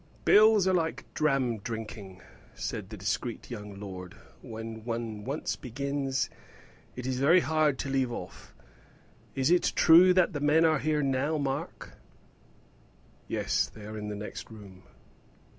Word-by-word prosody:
"Bills 215 Hz, -2 st, +6 dB
are 190 Hz, -, +3 dB
like 165 Hz, -2 st, -1 dB
dram 135 Hz, -7 st, +1 dB
drinking," 105 Hz, -4 st, -7 dB, 0.3 s
said 95 Hz, -3 st, -5 dB
the 110 Hz, -, -8 dB
discreet 115 Hz, +5 st, -3 dB
young 105 Hz, -3 st, -7 dB
lord: 95 Hz, -1 st, -8 dB, 0.3 s
"when 110 Hz, -2 st, -7 dB
one 115 Hz, -2 st, -4 dB
once 140 Hz, +6 st, -3 dB
begins, 135 Hz, +1 st, -2 dB, 0.7 s
it 125 Hz, -, -6 dB
is 130 Hz, -1 st, -2 dB
very 165 Hz, +7 st, +5 dB
hard 155 Hz, -4 st, +1 dB
to -, -, -4 dB
leave 135 Hz, -2 st, 0 dB
off. 90 Hz, -6 st, -8 dB, 0.8 s
Is 135 Hz, +4 st, +1 dB
it 180 Hz, -, +3 dB
true 175 Hz, +3 st, +7 dB
that 185 Hz, 0 st, +3 dB
the 145 Hz, -, -2 dB
men 150 Hz, +3 st, +4 dB
are 155 Hz, -3 st, +3 dB
here 150 Hz, +1 st, 0 dB
now, 140 Hz, +3 st, 0 dB
Mark?" 135 Hz, -2 st, -4 dB, 1.3 s
"Yes, -, -, 0 dB
they 105 Hz, -1 st, -12 dB
are 110 Hz, +1 st, -7 dB
in 105 Hz, -1 st, -5 dB
the 105 Hz, -, -4 dB
next 105 Hz, +1 st, -7 dB
room." 100 Hz, -4 st, -12 dB
130 Hz, 145 wpm, -29 LUFS, 110-150 Hz, 1.3 s, true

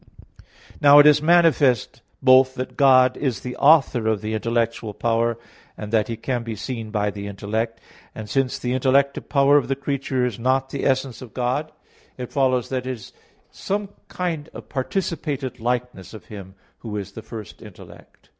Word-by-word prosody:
Now 145 Hz, 0 st, +8 dB
it 145 Hz, -, +8 dB
is 150 Hz, -1 st, +6 dB
manifest 155 Hz, -7 st, +3 dB, 0.2 s
both 130 Hz, 0 st, +5 dB
that 130 Hz, 0 st, -5 dB
God 130 Hz, -2 st, +5 dB
is 130 Hz, -6 st, -2 dB
the 125 Hz, 0 st, -6 dB
author 135 Hz, -6 st, +4 dB
of 110 Hz, -2 st, 0 dB
the 110 Hz, 0 st, -4 dB
intellectual 115 Hz, -1 st, -2 dB
power, 115 Hz, 0 st, 0 dB, 0.4 s
and 105 Hz, +1 st, -7 dB
that 110 Hz, -2 st, +2 dB
He 115 Hz, -, -5 dB
can 120 Hz, +1 st, -2 dB
be 115 Hz, -1 st, -5 dB
seen 115 Hz, 0 st, -6 dB
by 105 Hz, -1 st, -1 dB
the 100 Hz, 0 st, -7 dB
intellect. 110 Hz, +3 st, -3 dB, 0.4 s
And 110 Hz, -1 st, -7 dB
since 135 Hz, +2 st, 0 dB
the 125 Hz, 0 st, -3 dB
intellective 135 Hz, +2 st, +1 dB
power 140 Hz, 0 st, +4 dB
of 145 Hz, -, 0 dB
the 135 Hz, -, 0 dB
creature 135 Hz, -2 st, -2 dB
is 120 Hz, -4 st, -4 dB
not 130 Hz, +2 st, 0 dB
the 140 Hz, -, -2 dB
essence 130 Hz, -3 st, -1 dB
of 125 Hz, -4 st, -12 dB
God, 130 Hz, +5 st, -1 dB, 0.5 s
it 125 Hz, -1 st, -7 dB
follows 130 Hz, -3 st, +1 dB
that 130 Hz, -1 st, -3 dB
it -, -, -1 dB
is 115 Hz, -5 st, -12 dB, 0.4 s
some 200 Hz, 0 st, -3 dB, 0.2 s
kind 165 Hz, -4 st, -4 dB
of -, -, -10 dB
participated 140 Hz, -3 st, -3 dB
likeness 120 Hz, -4 st, -3 dB
of 110 Hz, -, -12 dB
Him 95 Hz, -2 st, -10 dB, 0.2 s
who 105 Hz, -3 st, -6 dB
is 100 Hz, -2 st, -6 dB
the 110 Hz, -, -9 dB
first 110 Hz, -2 st, -10 dB
intellect. -, -, -15 dB
125 Hz, 175 wpm, -22 LUFS, 115-140 Hz, 0.5 s, Now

